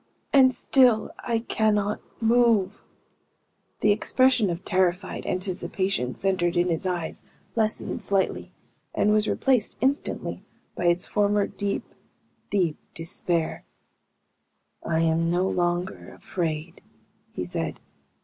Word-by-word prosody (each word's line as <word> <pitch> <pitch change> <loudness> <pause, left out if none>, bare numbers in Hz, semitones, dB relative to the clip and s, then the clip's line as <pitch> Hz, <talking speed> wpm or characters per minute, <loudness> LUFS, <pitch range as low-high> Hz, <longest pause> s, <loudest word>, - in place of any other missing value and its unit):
And 265 -2 +7
still 245 -2 +3
I 235 -2 -1
cannot 210 -1 +1 0.2
move!" 225 -4 +3 1.0
The 210 - +4
expression 240 +1 +3
of 175 +2 -4
terrified 185 0 0
anticipation, 185 -6 -1
centered 180 -3 0
in 175 +1 +2
his 170 +3 -1
eyes, 175 -3 -3 0.3
lessened 220 -2 -1
slightly, 195 -1 0 0.4
and 210 - +3
was 215 0 +2
replaced, 255 -5 +1
instantly, 275 +3 -1 0.3
by 175 - -4
its 175 +1 +2
former 205 -1 +2
deep, 200 0 -3 0.7
deep 180 -6 +1 0.2
despair. 165 0 -2 1.2
"I 160 0 0
am 165 0 +2
no 180 +2 +1
longer 175 0 -2
afraid," 165 -1 -4 0.5
he 90 - -4
said. 80 -2 -4
190 Hz, 110 wpm, -25 LUFS, 175-215 Hz, 1.2 s, And